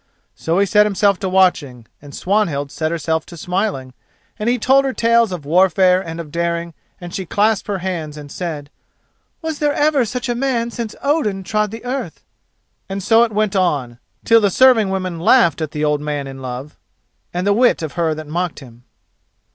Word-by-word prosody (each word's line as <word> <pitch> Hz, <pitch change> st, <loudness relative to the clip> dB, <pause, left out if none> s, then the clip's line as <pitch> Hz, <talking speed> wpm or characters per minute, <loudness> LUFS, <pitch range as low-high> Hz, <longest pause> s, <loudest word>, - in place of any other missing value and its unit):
So 165 Hz, +2 st, -2 dB
he 200 Hz, -, +4 dB
set 210 Hz, +2 st, +4 dB
himself 200 Hz, -1 st, +2 dB
to 190 Hz, -, -2 dB
watching, 165 Hz, -10 st, +1 dB, 0.2 s
and 145 Hz, -1 st, -11 dB
Swanhild 170 Hz, -8 st, 0 dB
set 155 Hz, -1 st, -2 dB
herself 160 Hz, -1 st, -1 dB
to 170 Hz, -, -11 dB
smiling, 180 Hz, -8 st, -2 dB, 0.5 s
and 210 Hz, +2 st, 0 dB
he 245 Hz, -, +2 dB
told 265 Hz, +4 st, +3 dB
her 270 Hz, -1 st, -1 dB
tales 230 Hz, -2 st, +3 dB
of 170 Hz, -6 st, -6 dB
warfare 180 Hz, +3 st, +3 dB
and 165 Hz, -2 st, -7 dB
of 155 Hz, -3 st, -7 dB
daring, 170 Hz, 0 st, -2 dB, 0.3 s
and 175 Hz, -1 st, -9 dB
she 195 Hz, -, -3 dB
clasped 210 Hz, +3 st, +1 dB
her 205 Hz, -2 st, -1 dB
hands 170 Hz, -5 st, -4 dB
and 145 Hz, -1 st, -10 dB
said: 155 Hz, -5 st, -5 dB, 0.7 s
"Was 320 Hz, -2 st, -4 dB
there 295 Hz, -1 st, +1 dB
ever 290 Hz, -3 st, +2 dB
such 240 Hz, +3 st, -4 dB
a 240 Hz, -, 0 dB
man 240 Hz, -2 st, -1 dB
since 230 Hz, -2 st, -5 dB
Odin 245 Hz, -10 st, 0 dB
trod 210 Hz, +3 st, 0 dB
the 225 Hz, +4 st, -9 dB
earth?" 260 Hz, +2 st, -5 dB, 0.7 s
And 195 Hz, 0 st, -4 dB
so 225 Hz, +3 st, +4 dB
it 235 Hz, -, -1 dB
went 210 Hz, -1 st, 0 dB
on, 140 Hz, -10 st, 0 dB, 0.3 s
till 230 Hz, 0 st, +5 dB
the 205 Hz, -, +3 dB
serving 230 Hz, -1 st, +4 dB
women 185 Hz, -3 st, -3 dB
laughed 175 Hz, -, +4 dB
at 155 Hz, -, -2 dB
the 150 Hz, +1 st, -2 dB
old 150 Hz, -1 st, 0 dB
man 150 Hz, -1 st, -3 dB
in 135 Hz, 0 st, -9 dB
love 130 Hz, +3 st, -7 dB, 0.5 s
and 180 Hz, +1 st, -3 dB
the 200 Hz, -, +3 dB
wit 240 Hz, -5 st, +3 dB
of 155 Hz, -, -5 dB
her 165 Hz, -2 st, 0 dB
that 155 Hz, 0 st, -7 dB
mocked 170 Hz, +3 st, -3 dB
him. 120 Hz, -3 st, -15 dB
185 Hz, 195 wpm, -18 LUFS, 155-220 Hz, 0.7 s, till